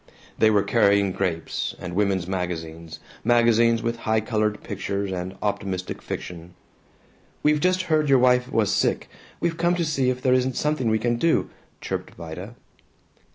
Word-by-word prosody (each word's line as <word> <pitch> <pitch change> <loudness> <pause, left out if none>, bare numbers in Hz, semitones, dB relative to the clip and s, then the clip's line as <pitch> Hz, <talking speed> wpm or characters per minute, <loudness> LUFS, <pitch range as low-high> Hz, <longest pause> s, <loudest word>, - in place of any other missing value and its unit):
They 110 - +5
were 105 -2 +3
carrying 100 -2 +3
grapes, 90 -4 -2
and 90 -1 -7
women's 100 -2 +1
magazines, 85 -3 -5 0.2
magazines 115 0 +3
with 115 0 -1
high 110 -1 +1
colored 110 -2 -1
pictures 100 0 -3
and 95 +1 -4
optimistic 95 -3 -3
fiction. 85 0 -7 0.9
"We 150 0 +3
just 185 +3 +2
heard 155 -4 +1
your 135 - +6
wife 125 0 +3
was 105 -2 +2
sick. - - 0 0.3
We've 170 -1 -1
come 175 +1 +2
to 170 -1 0
see 135 -4 +1
if 125 0 -1
there 130 - +4
isn't 130 0 +1
something 150 -6 0
we 110 - +3
can 120 +1 0
do," 165 +7 +1 0.3
chirruped - - -5
Vida. 90 +7 -8
110 Hz, 155 wpm, -24 LUFS, 95-125 Hz, 0.9 s, your